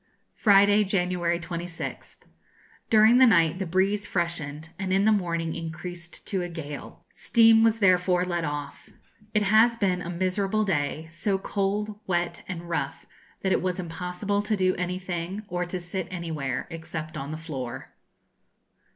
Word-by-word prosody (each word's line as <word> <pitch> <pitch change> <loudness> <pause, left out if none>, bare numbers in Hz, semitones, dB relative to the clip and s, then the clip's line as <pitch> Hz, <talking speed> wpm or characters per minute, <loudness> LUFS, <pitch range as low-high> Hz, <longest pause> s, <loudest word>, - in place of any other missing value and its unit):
Friday, 205 0 +5
January 180 -3 0
26th. 170 0 -6 0.7
During 220 +3 +6
the 260 - +8
night 170 -5 +4
the 190 - -2
breeze 195 +4 +1
freshened, 160 -3 -3
and 190 -1 -2
in 195 +2 +3
the 220 - +5
morning 170 -5 0
increased 170 +1 -7
to 190 -2 -1
a 175 - -4
gale. 150 -4 -8
Steam 225 -1 +5
was 225 0 +4
therefore 180 -3 +3
let 175 -2 -2
off. 145 -2 -5 0.5
It 210 - +4
has 220 +4 +5
been 185 -4 +1
a 175 - -5
miserable 190 +4 0
day; 155 -3 -1
so 195 +4 0
cold, 205 +2 -2
wet, 175 -1 -1
and 175 -2 -6
rough, 170 - -3 0.4
that 190 - +1
it - - +2
was 185 +1 -1
impossible 180 +4 -2
to 210 0 -1
do 185 -1 +2
anything, 180 +2 -4
or 180 -1 -2
to 180 +1 -4
sit 175 0 -4
anywhere, 160 -7 -3
except 160 -1 -6
on 140 -1 -5
the 155 - -4
floor. 130 -6 -6
180 Hz, 150 wpm, -26 LUFS, 165-200 Hz, 0.7 s, the